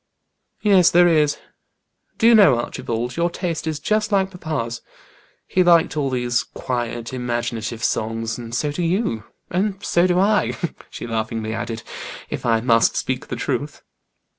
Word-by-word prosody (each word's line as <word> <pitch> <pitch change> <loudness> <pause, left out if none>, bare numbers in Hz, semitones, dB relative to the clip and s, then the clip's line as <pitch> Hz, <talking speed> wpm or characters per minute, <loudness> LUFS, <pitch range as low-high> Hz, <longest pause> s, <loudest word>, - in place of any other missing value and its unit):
"Yes, 195 -5 +6
there 175 +1 +5
is. 150 -3 +3 0.8
Do - - +1
you 235 - +8
know, 195 - +7
Archibald, 120 0 -3
your 170 +1 +2
taste 170 -2 -3
is 155 -2 -1
just 215 +6 0
like 195 -1 +2
papa's. 145 -10 -4 0.6
He 185 - +1
liked 170 -3 +4
all 145 -3 0
these 125 -2 0
quiet, 120 -1 -4
imaginative 120 -2 -3
songs, 115 0 -1
and 120 -1 -6
so 145 +4 0
do 160 - -3
you. 170 - 0 0.3
And 195 +2 0
so 175 +1 +3
do 180 -1 +2
I," 210 +2 +2 0.3
she - - -7
laughingly 110 -1 -3
added, 115 0 -4 0.5
"if - - -3
I 115 -1 +3
must 115 -1 +3
speak 130 +2 -2
the - - -4
truth." 145 +2 -3
135 Hz, 155 wpm, -21 LUFS, 115-175 Hz, 0.8 s, you